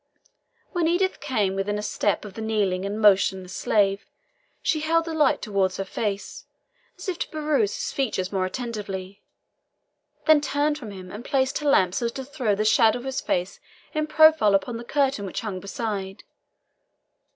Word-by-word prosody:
When 345 -3 +1
Edith 375 +3 +1
came 215 -10 0
within 195 +2 -1
a 210 - -4
step 205 0 0
of 205 - -9
the 225 - -7
kneeling 200 -4 0
and 205 +2 -4
motionless 190 -3 +3
slave, 200 -1 +1 0.6
she 310 - +1
held 325 +2 +1
the 330 - -4
light 300 -4 +2
towards 195 -3 0
his 195 - -4
face, 205 -2 -4 0.5
as 360 - -9
if 360 -2 -3
to - - -2
peruse 295 -9 0
his - - -3
features 205 -9 -1
more 190 -2 0
attentively, 200 -4 -5 1.0
then 310 -2 +6
turned 295 +1 0
from 230 -6 -8
him, 185 -2 -9
and 215 +3 -7
placed 265 0 0
her 295 -1 0
lamp 185 -9 +4
so 235 +4 0
as - - -3
to 265 - -6
throw 255 -7 -1
the 215 +2 -1
shadow 220 +2 +4
of 245 - -9
his 265 0 -2
face 180 +2 -2 0.3
in 305 0 -1
profile 315 -9 +6
upon 195 +5 -1
the 235 - -7
curtain 270 -4 0
which 190 - -4
hung 205 -4 -4
beside. 195 -1 -4
220 Hz, 180 wpm, -25 LUFS, 195-285 Hz, 1.0 s, then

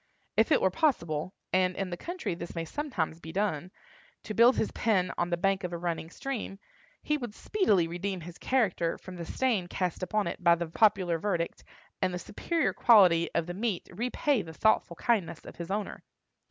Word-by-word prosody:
If - - +3
it - - +5
were - - +4
possible—and 185 - 0
in 195 -2 -3
the - - -2
country 345 - -4
this 170 +1 -7
may 165 0 -2
sometimes 175 - -3
be 160 -1 -8
done—to 190 +3 -5
build 235 +4 +6
his 220 - 0
pen 190 -5 +1
on 175 - -1
the 175 - 0
bank 195 +2 +1
of 180 -1 -3
a - - -2
running 170 -1 -3
stream, 230 -2 -5 0.5
he 300 - +1
would 240 -6 -6
speedily 210 - +2
redeem 180 +2 -3
his 170 +1 -10
character 200 -10 +1
from 185 - -10
the 170 - -5
stain 230 -9 0
cast 180 -1 -2
upon 210 +3 0
it - - -5
by 170 -1 +6
the 170 0 -3
popular 180 -1 +2
verdict, 175 -3 -2 0.4
and 185 - +2
the 180 - -3
superior 320 - -1
quality 180 -8 +6
of 170 - +1
the 175 - -5
meat 205 -1 -2
repay 245 +5 0
the 160 -3 -9
thoughtful 195 -2 +2
kindness 175 -7 0
of - - -11
his 170 0 -6
owner. 205 +1 -3
185 Hz, 190 wpm, -29 LUFS, 170-220 Hz, 0.5 s, build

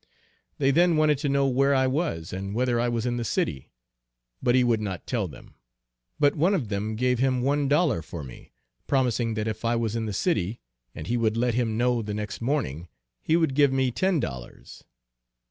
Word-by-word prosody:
They 135 -1 +2
then 170 +2 +4
wanted 150 -2 +3
to 145 -1 -1
know 140 0 +2
where 135 +2 +2
I 130 0 +3
was 130 - -2
and 100 +2 -4
whether 120 0 +1
I 120 +1 +1
was 115 -1 -2
in 120 -1 -1
the 120 - -2
city; 70 - -2 0.7
but 120 - +2
he 130 - +5
would 115 -3 +2
not 95 -6 -5
tell - - -1
them, - - -14 0.7
but 145 -1 +3
one 175 +7 +2
of 130 - -2
them 105 +2 -2
gave 125 +1 +1
him 130 -1 +1
one 140 +1 +1
dollar 145 - +2
for 85 -2 -8
me, 65 -3 -12 0.4
promising 120 -4 +1
that 110 0 -2
if 110 - -4
I 115 +1 +1
was 115 -1 -1
in 115 -1 -2
the - - -3
city, 110 - -1 0.4
and 75 - -7
he 120 - 0
would 115 -1 +1
let 120 0 +1
him 115 -2 0
know 120 0 +2
the 105 -1 -4
next 105 +1 -5
morning, 115 - -2 0.3
he 160 - +1
would 160 -5 +1
give 140 0 +4
me 130 -1 +1
ten 185 +5 +1
dollars. 65 - -7
120 Hz, 210 wpm, -26 LUFS, 110-140 Hz, 0.7 s, he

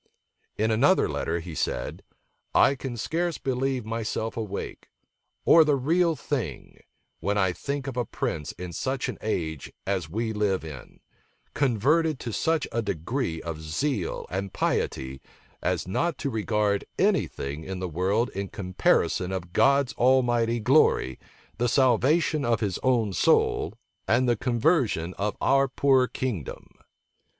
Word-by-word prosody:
In 110 +1 +1
another 140 +12 +4
letter 85 +1 -2
he 85 0 -8
said, - - -3 0.5
"I - - +6
can 130 -3 -6
scarce 165 +8 -1
believe 130 -2 -1
myself 110 0 -3
awake, 110 -4 -5 0.6
or 165 - +8
the 150 -2 +2 0.4
thing 110 - -4
real, - - -23 0.4
when 105 +1 -1
I 95 -2 +2
think 140 +6 -4
of 135 -3 -5
a 125 - +2
prince 75 -6 -3
in 90 -1 -7
such 130 +4 -2
an 120 - -6
age 80 -9 -3
as 95 -5 -1
we 110 +5 -2
live 100 -5 0
in, 75 -5 -10 0.5
converted 145 +4 +2
to 115 - -4
such 160 +3 +1
a 115 - 0
degree 100 - -3
of 80 -2 -5
zeal 90 - -2
and 95 +1 -3
piety, 65 0 -2 0.4
as - - -1
not 165 - 0
to 140 - -3
regard 105 -2 0
any - - +3
thing 70 +3 -6
in 95 +2 -5
the 90 0 -3
world 95 +8 0
in 100 +1 -4
comparison 95 -1 +1
of 90 -2 -5
God 140 -2 +3
Almighty's 120 -2 +3
glory, 125 - +3 0.4
the 120 0 +2
salvation 140 +4 +3
of 115 -4 +1
his 100 -5 -2
own 115 -6 +2
soul, - - +2 0.3
and 125 +3 +3
the 120 - +3
conversion 120 - +1
of 105 +1 -1
our 135 0 +3
poor 130 -1 +3
kingdom." 110 - -5
115 Hz, 145 wpm, -26 LUFS, 95-130 Hz, 0.6 s, or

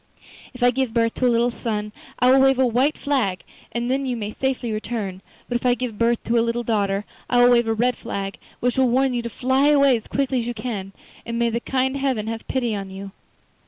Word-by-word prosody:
If 250 - -4
I 245 - +6
give 255 -2 -2
birth 230 -1 +2
to 255 - +1
a - - +4
little 235 +1 +2
son 210 -3 -3 0.3
I 250 +1 +4
will 265 - +6
wave 270 -1 +4
a 260 - +4
white 255 +6 +1
flag, 250 -11 -1 0.3
and 240 +1 -2
then 270 0 0
you 245 -2 -2
may 210 -1 -4
safely 260 -1 -2
return; 215 -3 -4 0.3
but 245 - 0
if - - -12
I 245 -1 +3
give 245 -4 -5
birth 235 0 +2
to 235 +1 +2
a - - +4
little 235 +1 -1
daughter 205 -3 0 0.2
I 245 -1 +5
will 245 - +6
wave 240 -1 +4
a 225 - +2
red 245 +2 +1
flag, 200 -3 -5 0.2
which 245 +1 +1
will 260 -2 +4
warn 260 +2 +2
you 240 - -1
to 235 - -5
fly 260 +5 +1
away 280 -3 +5
as 225 - -6
quickly 270 -2 0
as 235 - -3
you 240 - -3
can, 210 -4 -5 0.3
and 235 0 -4
may 235 0 +1
the 235 - -1
kind 265 +2 -1
Heaven 265 -6 -1
have 225 0 -5
pity 240 -4 -1
on 195 -1 -5
you. 195 +1 -8
240 Hz, 245 wpm, -22 LUFS, 225-255 Hz, 0.3 s, I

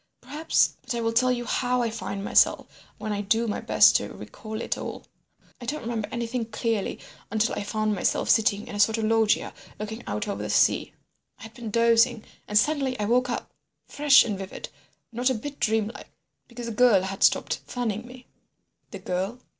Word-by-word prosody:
Perhaps—But 285 -1 0
I 235 - -2
will 225 0 0
tell 255 +2 +3
you 240 -1 -2
how 250 0 0
I 230 - -1
find 200 -3 -5
myself - - +3 0.3
when 215 - -4
I 205 - -2
do 225 +3 +1
my 210 - -2
best - - +5
to - - -6
recall 220 0 -8
it - - -2
all. - - -7 0.6
I 240 - -8
don't 300 0 -3
remember 225 -2 -3
anything 235 0 -3
clearly 225 -2 -2 0.3
until 220 +2 0
I - - -3
found 215 +1 -1
myself 195 - 0
sitting 210 -1 +3
in 245 - -8
a 205 - -5
sort 220 +2 +4
of 225 - -2
loggia 220 0 +2 0.2
looking 220 +2 -6
out 210 +1 -3
over 200 - -3
the - - -4
sea. - - +2 0.4
I - - -14
had 225 0 -10
been 230 -2 -7
dozing, 230 +1 +3 0.2
and 210 - +1
suddenly 270 0 +1
I 210 - 0
woke 250 +3 +2
up—fresh 285 +3 +2
and 205 -4 -3
vivid—not 235 +5 -5
a 260 - 0
bit 280 +6 -7
dreamlike—because 225 +2 -4
the 230 - -4
girl 220 -4 +4
had 195 +1 -5
stopped - - +3
fanning 235 -2 -3
me." 250 0 -13 0.6
"The 200 - -7
girl?" 190 +4 -3
225 Hz, 185 wpm, -26 LUFS, 210-245 Hz, 0.6 s, best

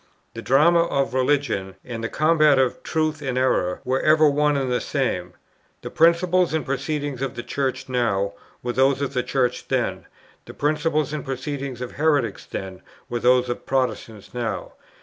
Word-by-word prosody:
The 115 - -7
drama 160 +8 +4
of 135 -5 -1
religion, 130 -8 0
and 115 -2 -6
the 115 - -2
combat 155 -2 +4
of 130 -2 +1
truth 155 -1 -1
and 130 -3 -2
error, 110 -8 +1
were 130 +1 +1
ever 155 0 +5
one 145 0 +2
and 135 -2 -1
the 125 - 0
same. 90 -11 -2 0.5
The - - -6
principles 170 +1 +3
and 155 -5 -1
proceedings 145 -1 -3
of 135 -3 -3
the 120 - -5
Church 130 +1 -2
now, 100 -6 0 0.3
were 120 0 -2
those 135 +1 +3
of 140 - -3
the 125 - +1
Church 125 -1 -1
then; - - -1 0.4
the - - -11
principles 150 0 0
and 150 - -3
proceedings 135 -1 -5
of 125 - -5
heretics 145 -5 0
then, 95 -1 -6 0.3
were 120 - -1
those 125 +1 +3
of 120 - -5
Protestants 125 -5 -2
now. 120 -3 -3
135 Hz, 170 wpm, -23 LUFS, 125-150 Hz, 0.5 s, ever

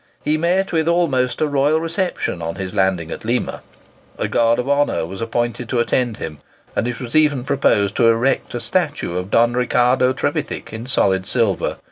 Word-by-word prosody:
He 150 - +1
met 180 +4 +1
with 160 -2 +1
almost 145 -8 +1
a 155 - +3
royal 145 +2 +2
reception 165 - -2
on 85 0 -4
his 95 0 -5
landing 95 -5 0
at - - -6
Lima. 120 +3 -2 0.6
A - - -1
guard 115 0 +2
of 125 +1 -2
honour 140 - +1
was 95 +5 -8
appointed 120 +1 -2
to 125 - -1
attend 120 -1 0
him, 75 -3 -6 0.4
and 115 - 0
it 120 -1 -4
was 125 +2 -6
even 150 -5 +3
proposed 105 -7 +1
to 115 - +4
erect 120 +3 +1
a - - -2
statue 150 - -1
of 90 +1 -3
Don 120 +3 +3
Ricardo 125 +1 +2
Trevithick 130 - -3
in 115 +2 -6
solid 95 -7 +2
silver. 115 -6 0
125 Hz, 185 wpm, -20 LUFS, 110-145 Hz, 0.6 s, to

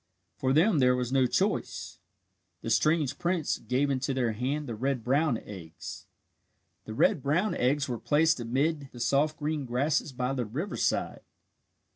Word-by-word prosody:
For 130 - 0
them 165 +4 +4
there 125 -1 +4
was 125 -1 -2
no 130 -1 +3
choice. - - -1 0.6
The 115 - -2
strange 150 +3 +2
prince 175 -3 0
gave 130 +5 0
into 135 0 -1
their 120 -3 +1
hand 135 +7 -2
the 120 - -4
red 130 +2 -2
brown 135 +1 +2
eggs. 85 -7 -9 0.8
The 110 - -7
red 135 - +3
brown 170 +10 +1
eggs 140 +3 +1
were 120 -3 -3
placed 160 +1 +2
amid 140 +5 -1
the 120 - -10
soft 145 +5 +1
green 150 -1 -2
grasses 135 +4 0
by 125 +1 -2
the 130 -2 -1
riverside. 145 - -2
135 Hz, 155 wpm, -28 LUFS, 125-150 Hz, 0.8 s, them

